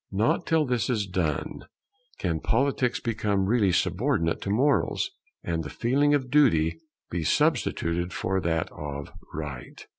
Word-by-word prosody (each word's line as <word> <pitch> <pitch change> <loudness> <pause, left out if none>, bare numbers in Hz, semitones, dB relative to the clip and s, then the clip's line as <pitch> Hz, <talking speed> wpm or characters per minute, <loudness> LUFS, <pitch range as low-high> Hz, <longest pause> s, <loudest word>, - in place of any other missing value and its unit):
Not 110 - +1
till 160 -2 +3
this 125 -3 0
is 110 -5 +1
done 90 -6 -2 0.5
can 85 -4 -1
Politics 130 - +1
become 105 -4 0
really 105 -2 +3
subordinate 90 - +1
to - - -4
Morals, 140 - +1 0.3
and 80 -1 -2
the - - -6
feeling 145 +5 +2
of 130 -3 -2
Duty 115 - +3 0.3
be 85 -1 -2
substituted 85 +2 +1
for 95 +2 -1
that 80 -2 -1
of 70 -1 -6 0.2
Right. 70 -5 -7
100 Hz, 140 wpm, -26 LUFS, 85-125 Hz, 0.5 s, till